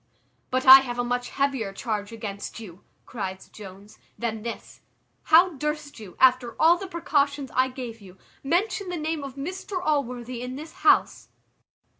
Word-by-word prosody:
"But 255 0 -1
I 265 +1 +12
have 245 -2 -5
a 245 - 0
much 245 0 -2
heavier 270 -7 -1
charge 210 -1 -4
against 215 -2 -7
you," 190 -5 -12 0.2
cries 190 -5 -6
Jones, 200 0 -13 0.2
"than 225 -2 -3
this. 230 +1 -8 0.4
How 345 +3 +6
durst 300 -1 -4
you, 200 -5 -12
after 255 -2 +3
all 330 +2 +6
the 380 +2 -7
precautions 285 -6 -1
I 255 +1 +3
gave 245 -4 -8
you, 190 -2 -14 0.3
mention 370 +6 0
the 355 - -3
name 310 -1 -3
of 275 -2 -8
Mr 365 +6 -5
Allworthy 250 -7 -2
in 250 +1 -5
this 310 +3 -8
house?" - - +3
255 Hz, 160 wpm, -25 LUFS, 225-300 Hz, 0.4 s, I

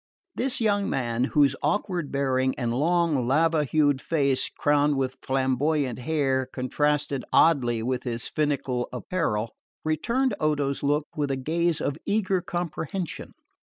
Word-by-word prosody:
This 255 +1 +1
young 205 -3 +1
man, 120 -1 0
whose 140 -1 +3
awkward 170 0 -1
bearing 130 -1 0
and 120 -3 -1
long 155 -2 +1
lava 155 +3 +2
hued 145 -1 +2
face 140 -5 +1
crowned 145 -1 +2
with 130 -1 -2
flamboyant 130 0 0
hair 135 -2 0
contrasted 140 +1 -1
oddly 120 -8 +3
with 125 +1 -1
his 120 -2 -3
finical 140 -5 -1
apparel, 120 -6 -2 0.3
returned 235 - 0
Odo's 145 -3 0
look 145 +1 +1
with 145 -2 -1
a 135 - -1
gaze 165 +4 0
of 145 +2 -2
eager 195 -3 +1
comprehension. 175 0 -4
145 Hz, 130 wpm, -26 LUFS, 130-160 Hz, 0.3 s, whose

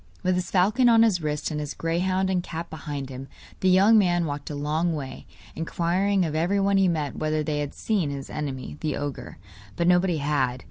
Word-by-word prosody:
With 185 - +2
his 180 0 -2
falcon 215 +7 +3
on 230 -1 +6
his 200 -6 +2
wrist, 150 0 -2
and 150 - -2
his 150 -1 -5
greyhound 185 +3 0
and 180 -1 +1
cat 170 0 -6
behind 145 -3 -5
him, 130 +1 -7 0.3
the 190 - +2
young 200 +4 +6
man 175 -3 +2
walked 145 -1 -5
a 150 - -4
long 155 +4 0
way, 135 -3 -7 0.3
inquiring 180 +4 0
of 155 - -3
everyone 195 +5 +2
he 195 -1 +4
met 155 -5 -1
whether 155 0 0
they 150 0 -2
had 145 -1 -4
seen 200 -9 0
his 140 -1 -5
enemy 140 -2 -5
the 155 -2 -2
ogre. 140 -3 -5 0.4
But 170 - 0
nobody 180 -1 +3
had. 140 -4 0
165 Hz, 200 wpm, -25 LUFS, 145-185 Hz, 0.4 s, on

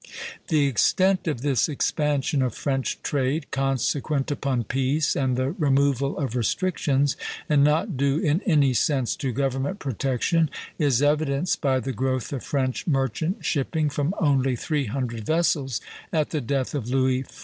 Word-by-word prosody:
The 155 -4 +3
extent 185 - +2
of 145 -7 -1
this 140 0 +2
expansion 145 -1 0
of 130 -2 -1
French 135 -2 -2
trade, 140 +2 0
consequent 135 +2 0
upon 135 -4 -1
peace 135 +6 0
and 130 -2 +1
the 130 +2 0
removal 140 - +1
of 135 -5 -2
restrictions, 140 - +1 0.3
and 145 -2 +4
not 155 - +2
due 140 +1 +2
in 155 +3 +1
any 145 -8 +3
sense 130 -1 +1
to 135 - -2
government 135 - -1
protection, 140 - 0 0.3
is 140 -4 +2
evidenced 145 +2 +1
by 135 -2 +2
the 130 +2 -4
growth 130 +2 -2
of 135 - -4
French 130 0 -2
merchant 155 - -1
shipping 150 +1 0
from 145 +7 -1
only 135 -6 +2
three 150 +3 -1
hundred 115 -1 -3
vessels 145 -3 0 0.3
at 155 -2 0
the 155 - -1
death 130 +1 -1
of 125 -5 -3
Louis 130 0 +2
XIV. 130 - -13
140 Hz, 155 wpm, -24 LUFS, 130-150 Hz, 0.3 s, and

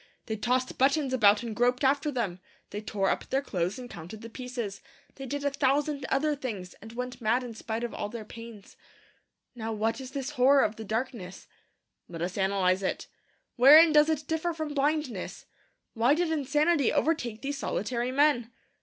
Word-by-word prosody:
They 220 - -3
tossed 250 +4 -1
buttons 275 0 +2
about 210 -3 +5
and 225 -2 -5
groped 245 +3 +2
after 280 +3 +2
them; 210 -9 -2 0.3
they 205 - -4
tore 200 -3 -1
up - - -3
their 270 +1 0
clothes 180 -4 -2
and 250 -1 -7
counted 175 +1 -9
the 230 - -9
pieces; 240 -5 -5 0.3
they 270 -1 -8
did 285 +3 -3
a 285 - +2
thousand 280 0 0
other 295 +2 +1
things, 210 -10 -6
and 220 +2 -10
went 250 +1 -5
mad 235 +3 +2
in 240 -2 -7
spite 225 +1 -4
of 240 - -3
all 205 - -4
their 225 -1 -7
pains. 230 -3 -11 0.8
Now 225 -2 -4
what 225 +4 -1
is 260 - -7
this 270 +1 -4
horror 275 0 +5
of 210 - 0
the 220 - -6
darkness? 220 -4 -4 0.6
Let 170 -1 -5
us 180 +1 -3
analyse 190 -1 +1
it. 190 - -2 0.5
Wherein 305 +6 +9
does 300 +1 +6
it 305 -2 -1
differ 320 +2 -1
from 315 -2 -4
blindness? 290 -7 -1 0.5
Why 240 +5 +3
did 340 0 0
insanity 295 0 +2
overtake 245 -9 0
these 280 0 -3
solitary 240 +2 -2
men? 260 -4 +2
250 Hz, 180 wpm, -28 LUFS, 220-285 Hz, 0.8 s, Wherein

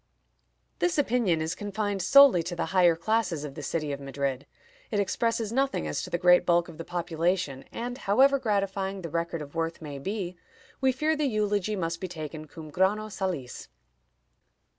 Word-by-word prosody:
" - - -46
This 355 -2 +1
opinion 230 - +2
is 160 - -2
confined 205 -1 -3
solely 275 -1 +7
to 175 +2 -5
the 170 - -1
higher 175 -3 +5
classes 180 -3 0
of 145 -2 -6
the 150 - -7
city 150 +1 -2
of 140 - -4
Madrid. 140 -1 -3 0.4
It 210 - 0
expresses 225 +2 0
nothing 270 - 0
as 75 - -2
to - - -6
the - - 0
great 180 0 +5
bulk 175 0 +2
of 160 - -12
the - - -4
population, 170 -4 -1
and, 245 +2 -5
however 270 +7 +4
gratifying 195 -4 -1
the 165 - -4
record 170 0 -2
of 145 - -12
worth 165 0 -2
may 145 -3 -7
be, 185 +2 -4 0.4
we 265 0 +4
fear 305 +5 0
the 300 -2 0
eulogy 210 -3 0
must 165 -3 -3
be 185 - -2
taken 155 -2 -7
cum 155 0 -10
grano 205 +5 +1
salis. 180 -12 -4
180 Hz, 185 wpm, -27 LUFS, 165-215 Hz, 0.4 s, solely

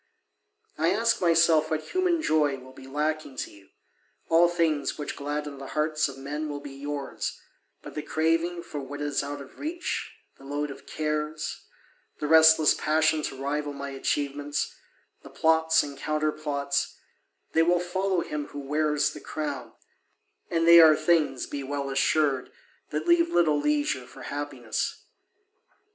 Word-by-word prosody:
I 165 +2 +3
ask 230 +4 +2
myself 165 -2 +4
what 155 -1 -3
human 360 -3 +1
joy 150 - +2
will 130 0 -13
be 130 0 -12
lacking 150 0 -2
to - - -4
you: 100 -1 -18 0.6
all 165 +1 +6
things 160 -5 0
which 150 - -4
gladden 145 0 -4
the 135 - -7
hearts 155 0 +2
of 135 - -9
men 150 +3 -4
will 145 -1 -4
be 145 -1 -9
yours 140 0 -4 0.4
but - - -9
the 150 - -3
craving 165 +3 0
for 150 - -6
what 140 +2 -7
is 145 -1 -1
out 145 +1 -5
of 135 - -13
reach, 340 +4 -3 0.3
the - - -15
load 145 +1 -3
of - - -12
cares, 155 0 -3 0.5
the - - -2
restless 160 0 +7
passion 155 0 +2
to 140 - -4
rival 145 +1 -2
my 140 0 -6
achievements, 145 +1 -2 0.5
the - - -12
plots 160 0 +3
and 140 -1 -8
counterplots, 150 -2 -1 0.6
they 165 - +4
will 175 +2 +3
follow 185 +1 0
him 150 -2 -4
who 145 - -8
wears 150 +1 +1
the - - -9
crown, 145 -6 -4 0.8
and 165 0 +1
they 170 0 +10
are 155 -1 +8
things, 155 -5 +1
be 145 - -5
well 140 0 -3
assured, 140 -1 +1 0.4
that - - -3
leave 340 0 +4
little 155 - +3
leisure 295 - 0
for - - -12
happiness. - - -4
150 Hz, 155 wpm, -27 LUFS, 145-160 Hz, 0.8 s, they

